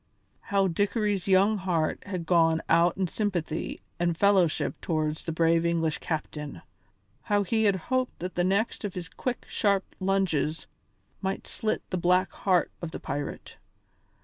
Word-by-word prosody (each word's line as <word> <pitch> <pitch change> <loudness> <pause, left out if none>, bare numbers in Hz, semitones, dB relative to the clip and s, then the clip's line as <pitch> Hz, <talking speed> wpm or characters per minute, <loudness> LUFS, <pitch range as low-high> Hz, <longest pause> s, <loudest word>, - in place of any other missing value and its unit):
How 195 -1 +1
Dickory's 205 +2 0
young 195 +2 +4
heart 175 -4 0
had 180 -4 -4
gone 165 -1 +3
out 170 +1 +4
in 190 -1 +1
sympathy 175 -4 -2 0.2
and 170 -1 +1
fellowship 190 -5 +2
towards 155 -2 -1
the 165 - -2
brave 165 +1 +3
English 165 -2 0
captain! 150 -2 -4 0.6
How 205 +5 +1
he 220 +3 +1
had 200 -2 +4
hoped 255 +7 -1
that 180 +1 -5
the 175 - +1
next 200 +6 0
of 205 -3 -4
his 180 -2 -5
quick, 250 +7 -4
sharp 200 -2 0
lunges 185 -5 0 0.6
might 195 0 -2
slit 215 0 -2
the 185 - 0
black 180 +2 +3
heart 185 -3 +1
of 170 - -4
the - - -7
pirate! 145 0 -5
180 Hz, 150 wpm, -28 LUFS, 165-200 Hz, 0.6 s, young